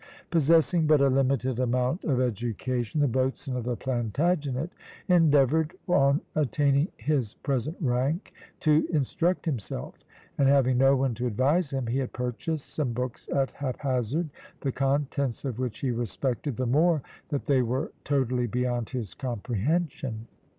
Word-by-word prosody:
Possessing 165 Hz, +1 st, +4 dB
but 155 Hz, -1 st, +5 dB
a 140 Hz, 0 st, +4 dB
limited 130 Hz, -2 st, +1 dB
amount 125 Hz, +5 st, 0 dB
of 135 Hz, -5 st, +1 dB
education, 120 Hz, +2 st, -1 dB
the 145 Hz, -, +4 dB
boatswain 130 Hz, +1 st, -1 dB
of 125 Hz, -2 st, -3 dB
the 125 Hz, -1 st, -1 dB
Plantagenet 135 Hz, -, -1 dB, 0.4 s
endeavoured, 160 Hz, -2 st, +4 dB
on 140 Hz, -5 st, +3 dB
attaining 145 Hz, 0 st, +2 dB
his 130 Hz, -3 st, -1 dB
present 140 Hz, +4 st, -2 dB
rank, 135 Hz, -, 0 dB, 0.3 s
to 155 Hz, 0 st, +3 dB
instruct 165 Hz, +5 st, 0 dB
himself; 115 Hz, -, -4 dB, 0.5 s
and 140 Hz, -, +5 dB
having 130 Hz, -3 st, +4 dB
no 135 Hz, +1 st, +6 dB
one 135 Hz, -2 st, +1 dB
to 120 Hz, +3 st, -2 dB
advise 140 Hz, -, +2 dB
him, 135 Hz, -3 st, -2 dB
he 120 Hz, +4 st, 0 dB
had 130 Hz, -, -3 dB
purchased 130 Hz, +4 st, -3 dB
some 140 Hz, -6 st, -1 dB
books 125 Hz, 0 st, -4 dB
at 135 Hz, -1 st, +1 dB
haphazard, 135 Hz, +2 st, -2 dB, 0.3 s
the 135 Hz, -, 0 dB
contents 135 Hz, -1 st, -1 dB
of 125 Hz, -3 st, -3 dB
which 125 Hz, -3 st, -3 dB
he 130 Hz, -, 0 dB
respected 120 Hz, +3 st, -2 dB
the 130 Hz, -, 0 dB
more 155 Hz, +4 st, +3 dB, 0.3 s
that 145 Hz, -3 st, -2 dB
they 135 Hz, -3 st, +3 dB
were 125 Hz, +5 st, -1 dB
totally 130 Hz, -3 st, +1 dB
beyond 120 Hz, 0 st, -1 dB
his 120 Hz, -7 st, -4 dB
comprehension. 125 Hz, -, -2 dB
135 Hz, 145 wpm, -27 LUFS, 125-150 Hz, 0.5 s, no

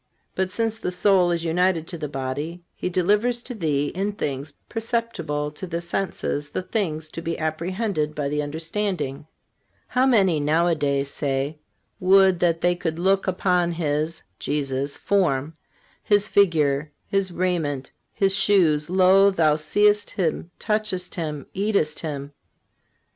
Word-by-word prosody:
But 190 Hz, 0 st, -1 dB
since 225 Hz, +2 st, -2 dB
the -, -, -2 dB
soul 180 Hz, 0 st, +3 dB
is 170 Hz, -1 st, -1 dB
united 170 Hz, 0 st, +1 dB
to 175 Hz, -, -5 dB
the 150 Hz, -, -3 dB
body, 145 Hz, +5 st, -4 dB
He -, -, -3 dB
delivers 210 Hz, +7 st, +1 dB
to 255 Hz, -, -6 dB
thee 150 Hz, -8 st, 0 dB
in 200 Hz, +3 st, -2 dB
things 140 Hz, -6 st, -4 dB, 0.2 s
perceptible 225 Hz, -11 st, -2 dB
to 170 Hz, +5 st, -7 dB
the 170 Hz, -1 st, -3 dB
senses 170 Hz, -4 st, -3 dB
the 185 Hz, -, -3 dB
things 170 Hz, -6 st, -2 dB
to 165 Hz, -, -7 dB
be 165 Hz, 0 st, -3 dB
apprehended 160 Hz, 0 st, -2 dB
by 145 Hz, -2 st, -1 dB
the 150 Hz, +1 st, -1 dB
understanding. 160 Hz, -1 st, -3 dB, 0.6 s
How 255 Hz, +2 st, +3 dB
many 195 Hz, -, +4 dB
nowadays 150 Hz, -3 st, +1 dB
say: 140 Hz, +1 st, -2 dB, 0.4 s
'Would 190 Hz, -1 st, +5 dB
that 165 Hz, -2 st, +1 dB
they 175 Hz, 0 st, +3 dB
could 165 Hz, -2 st, -3 dB
look 195 Hz, +3 st, +2 dB
upon 180 Hz, -2 st, +1 dB
His 155 Hz, 0 st, -1 dB, 0.2 s
(Jesus') 140 Hz, -1 st, -2 dB
form, 160 Hz, -7 st, +1 dB, 0.5 s
His 205 Hz, 0 st, +3 dB
figure, 155 Hz, -8 st, +2 dB
His 195 Hz, -2 st, 0 dB
raiment, 165 Hz, -7 st, -1 dB, 0.2 s
His 195 Hz, -1 st, +2 dB
shoes. 175 Hz, -7 st, +3 dB
Lo! 190 Hz, +2 st, +5 dB
thou 160 Hz, -6 st, +3 dB
seest 205 Hz, +7 st, +2 dB
Him, 170 Hz, -2 st, -2 dB
touchest 210 Hz, -4 st, -2 dB
Him, 150 Hz, -5 st, -4 dB
eatest 195 Hz, -6 st, 0 dB
Him. 145 Hz, -3 st, -5 dB
170 Hz, 140 wpm, -24 LUFS, 150-195 Hz, 0.6 s, Would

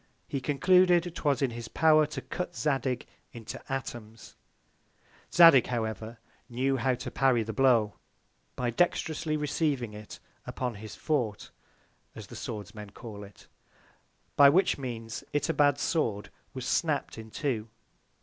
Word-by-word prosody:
He 135 Hz, -, -3 dB
concluded, 175 Hz, +4 st, +3 dB
'twas 145 Hz, -4 st, 0 dB
in 130 Hz, -, +1 dB
his 115 Hz, 0 st, -7 dB
Power 155 Hz, +2 st, +4 dB
to 150 Hz, -, -6 dB
cut 180 Hz, -1 st, -5 dB
Zadig 135 Hz, -4 st, -1 dB, 0.3 s
into 115 Hz, -2 st, -8 dB
Atoms. 115 Hz, -4 st, -6 dB, 1.0 s
Zadig, 165 Hz, -7 st, +7 dB
however, 110 Hz, -1 st, -4 dB, 0.3 s
knew 130 Hz, +3 st, 0 dB
how 130 Hz, +1 st, +1 dB
to 125 Hz, -, -7 dB
parry 125 Hz, -3 st, +2 dB
the 110 Hz, +1 st, -5 dB
Blow, 120 Hz, -6 st, +3 dB, 0.6 s
by 120 Hz, -1 st, -1 dB
dexterously 160 Hz, +1 st, 0 dB
receiving 145 Hz, -6 st, -1 dB
it 105 Hz, 0 st, -10 dB, 0.3 s
upon 125 Hz, -2 st, -3 dB
his 105 Hz, 0 st, -9 dB
Fort 125 Hz, -10 st, -2 dB, 0.6 s
(as -, -, -8 dB
the -, -, -12 dB
Swords 105 Hz, -3 st, -6 dB
men 105 Hz, -2 st, -9 dB
call 105 Hz, 0 st, -10 dB
it) 100 Hz, 0 st, -15 dB, 0.9 s
by 140 Hz, -1 st, +8 dB
which 180 Hz, +6 st, +3 dB
Means 115 Hz, -4 st, -6 dB
Itobad's 145 Hz, -2 st, +2 dB
Sword 110 Hz, -11 st, -1 dB, 0.2 s
was 130 Hz, -1 st, -5 dB
snapt 150 Hz, -7 st, -1 dB
in 110 Hz, 0 st, -10 dB
two. 115 Hz, -3 st, -3 dB
130 Hz, 135 wpm, -29 LUFS, 115-150 Hz, 1.0 s, by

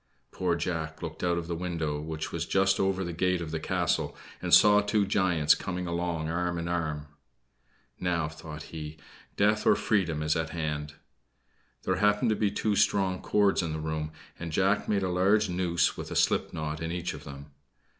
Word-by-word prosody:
Poor 90 Hz, -2 st, 0 dB
Jack 80 Hz, -2 st, -3 dB
looked 80 Hz, 0 st, -6 dB
out 85 Hz, -1 st, +2 dB
of 85 Hz, -, -3 dB
the 85 Hz, -, -3 dB
window, 80 Hz, -4 st, -2 dB
which 80 Hz, 0 st, -5 dB
was -, -, -3 dB
just 95 Hz, 0 st, +2 dB
over 95 Hz, 0 st, +1 dB
the 85 Hz, -1 st, -4 dB
gate 90 Hz, +2 st, +1 dB
of 80 Hz, -2 st, -5 dB
the 80 Hz, -, -2 dB
castle, -, -, -1 dB, 0.2 s
and -, -, -3 dB
saw 105 Hz, 0 st, +7 dB
two 105 Hz, 0 st, +1 dB
giants 90 Hz, -6 st, +3 dB
coming 90 Hz, -1 st, -4 dB
along 85 Hz, -2 st, -2 dB
arm 85 Hz, +1 st, -1 dB
in 85 Hz, 0 st, -3 dB
arm. 80 Hz, -4 st, -2 dB, 0.9 s
"Now," 85 Hz, -3 st, 0 dB
thought 75 Hz, 0 st, -9 dB
he, 75 Hz, -1 st, -6 dB, 0.4 s
"death 105 Hz, +1 st, +3 dB
or -, -, +7 dB
freedom 85 Hz, -8 st, 0 dB
is 75 Hz, 0 st, +1 dB
at 80 Hz, -1 st, -1 dB
hand." 75 Hz, -2 st, -3 dB, 0.9 s
There 95 Hz, -, 0 dB
happened 105 Hz, +3 st, +3 dB
to -, -, +2 dB
be 105 Hz, -1 st, +1 dB
two 105 Hz, +1 st, 0 dB
strong 95 Hz, -2 st, +2 dB
cords 100 Hz, -2 st, +2 dB
in 85 Hz, -3 st, -3 dB
the 80 Hz, -, -3 dB
room, 80 Hz, 0 st, -3 dB, 0.3 s
and 85 Hz, -1 st, -5 dB
Jack 95 Hz, +5 st, +1 dB
made 100 Hz, -2 st, +1 dB
a -, -, +1 dB
large 100 Hz, +3 st, +3 dB
noose 90 Hz, -1 st, +1 dB
with -, -, -6 dB
a -, -, -5 dB
slip -, -, +2 dB
knot 75 Hz, 0 st, -4 dB
in 80 Hz, 0 st, -3 dB
each 90 Hz, 0 st, -3 dB
of -, -, -9 dB
them. 70 Hz, +1 st, -10 dB
85 Hz, 195 wpm, -28 LUFS, 80-95 Hz, 0.9 s, saw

